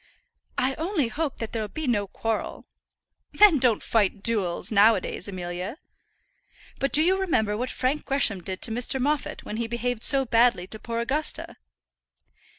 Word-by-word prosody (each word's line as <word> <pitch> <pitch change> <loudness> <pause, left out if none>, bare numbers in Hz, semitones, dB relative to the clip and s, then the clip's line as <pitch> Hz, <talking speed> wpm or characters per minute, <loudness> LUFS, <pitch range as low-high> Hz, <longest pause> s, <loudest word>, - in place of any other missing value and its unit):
"I 260 +2 +1
only 325 - 0
hope 300 +1 -3
that 225 - -6
there'll 220 -2 -2
be 315 +7 -6
no 210 -6 0
quarrel." 225 +3 -4 0.7
"Men 400 -8 +7
don't 240 -4 +2
fight 205 -2 +1
duels 205 -7 -1
now 215 +2 +6
a 190 - -2
days, 185 - -5
Amelia." 180 - -5 1.0
"But 275 - 0
do 305 - +6
you 375 +3 +2
remember 220 - +1
what 250 +4 -3
Frank 265 +4 -1
Gresham 250 -9 +1
did 185 +1 -6
to 230 - -1
Mr. 245 +3 0
Moffat 290 +2 -2
when 215 - -5
he 235 0 -2
behaved 235 0 -2
so 270 -1 +3
badly 230 -5 +3
to 215 +3 -8
poor 230 +1 -3
Augusta?" 290 +6 -2
235 Hz, 165 wpm, -25 LUFS, 210-275 Hz, 1.0 s, Men